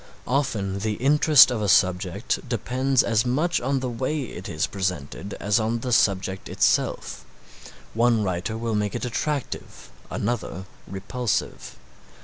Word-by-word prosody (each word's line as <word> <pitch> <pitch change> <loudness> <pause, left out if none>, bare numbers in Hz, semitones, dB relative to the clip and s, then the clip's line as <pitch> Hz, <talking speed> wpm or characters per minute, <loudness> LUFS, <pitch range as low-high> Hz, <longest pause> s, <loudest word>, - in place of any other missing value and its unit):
Often 110 -8 -1
the 110 +1 -1
interest 145 +3 +6
of 115 -3 -2
a 105 - 0
subject 95 +3 +2
depends 130 +3 +1
as 115 -1 +2
much 150 +8 0
on 135 +1 0
the 130 - -2
way 130 +5 -2
it 95 -6 -8
is 80 -2 0
presented 95 -1 -4
as 105 +2 +1
on 115 +1 -1
the 125 - -3
subject 95 -4 +1
itself. - - 0 0.7
One 115 -1 +3
writer 95 +3 -2
will 115 0 -2
make 105 0 -1
it 120 - -3
attractive, 140 +3 -4 0.2
another 105 -4 -3 0.2
repulsive. 100 +4 -3
115 Hz, 135 wpm, -24 LUFS, 100-125 Hz, 0.7 s, interest